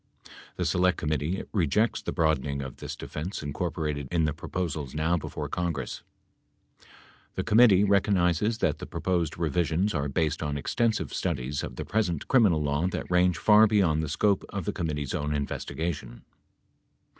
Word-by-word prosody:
The 90 - -2
Select 90 +2 +2
Committee 75 +4 -1
rejects 105 +4 +1
the - - -4
broadening 75 -4 0
of 65 -2 -8
this - - -6
defense 80 +6 -5
incor 75 +4 -3
porated 75 -4 -3
in 85 -2 +2
the 75 - 0
proposals 80 -4 -4
now 80 +3 +1
before 80 - -4
the - - -8
Congress. 85 -7 -3 1.3
The - - -1
committee 105 -3 +6
rec 100 -1 +3
ognizes 100 +3 +1
that 75 -2 +1
the - - -7
proposed 85 -4 -1
revisions 85 +4 0
are 70 -2 -1
based 75 +2 0
on 75 -2 -2
extensive 115 - 0
studies 70 +3 -2
of 65 - -6
the - - -5
present 95 -8 -1
criminal 100 - +4
law 75 +4 0
that 95 - -4
range 90 -2 +3
far 105 +6 +6
beyond 95 -7 +2
the 80 - -3
scope 100 +6 +1
of 100 -4 -4
the - - -2
com 85 - -2
mittee's 75 -3 -3
own 75 +1 -1
investigation. 70 -3 -4
80 Hz, 170 wpm, -27 LUFS, 75-95 Hz, 1.3 s, committee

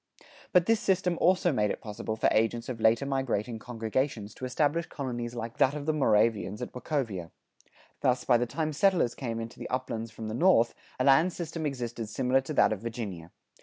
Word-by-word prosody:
[95:2] - - -22 0.3
But 180 -3 +5
this 225 +1 +3
system 185 -2 +1
also 180 0 +4
made 105 -6 +1
it - - -3
possible 110 0 -5
for 110 - +2
agents 115 +2 +1
of 115 -3 -5
later 115 +5 +4
migrating 125 -5 -1
congregations 115 -1 -2
to 130 - -6
establish 150 +6 0
colonies 120 -3 -4
like 115 0 -5
that 135 +2 +4
of 145 -1 -5
the 155 - +1
Moravians 110 -6 +2
at - - -5
Wachovia.[95:3] 120 - -3 0.7
Thus, 125 0 +2
by 120 - +4
the 120 +1 -1
time 155 +4 -2
settlers 175 - +3
came 115 -4 -4
into 115 0 -7
the - - -6
uplands 115 -3 -3
from 110 0 -7
the 110 - -4
north, 120 -4 +4 0.3
a - - +2
land 145 +7 +5
system 165 -2 -4
existed 120 -5 -4
similar 130 +3 +2
to 135 +3 -6
that - - +5
of 105 - -5
Virginia. 105 -8 -5
125 Hz, 200 wpm, -29 LUFS, 115-145 Hz, 0.7 s, But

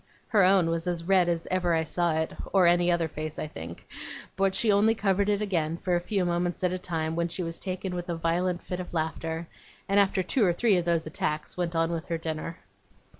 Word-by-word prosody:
Her 205 -3 +4
own 185 -3 +4
was 165 +1 -2
as 175 -2 -1
red 185 -1 +3
as 170 -1 -1
ever 180 -2 +2
I 160 - +1
saw 170 0 0
it, 160 0 -1 0.2
or 190 -2 +5
any 175 0 +4
other 170 -1 +1
face, 155 0 -6
I - - -3
think; 85 - -9 0.5
but 195 -1 +1
she 225 - +3
only 210 +3 +4
covered 200 -1 +1
it 205 0 +1
again, 165 -5 -1
for 180 0 0
a - - +2
few 195 0 0
moments 175 +1 -1
at 180 0 +2
a 185 - -3
time, 160 -3 -2
when 170 0 0
she 180 +2 -4
was 165 0 -3
taken 185 0 -4
with 175 0 -5
a 170 - -1
violent 175 +2 0
fit 180 - -4
of 180 -1 -6
laughter; 160 +1 -2 0.4
and 200 +1 +3
after 190 -1 +2
two 225 +6 +1
or 180 -3 +4
three 220 +2 +3
of 175 - -1
those 170 -2 +1
attacks, 155 -1 -3
went 175 -1 -2
on 165 +1 +1
with 165 -2 -4
her 170 - -1
dinner. 160 +1 -4
175 Hz, 235 wpm, -27 LUFS, 165-185 Hz, 0.5 s, or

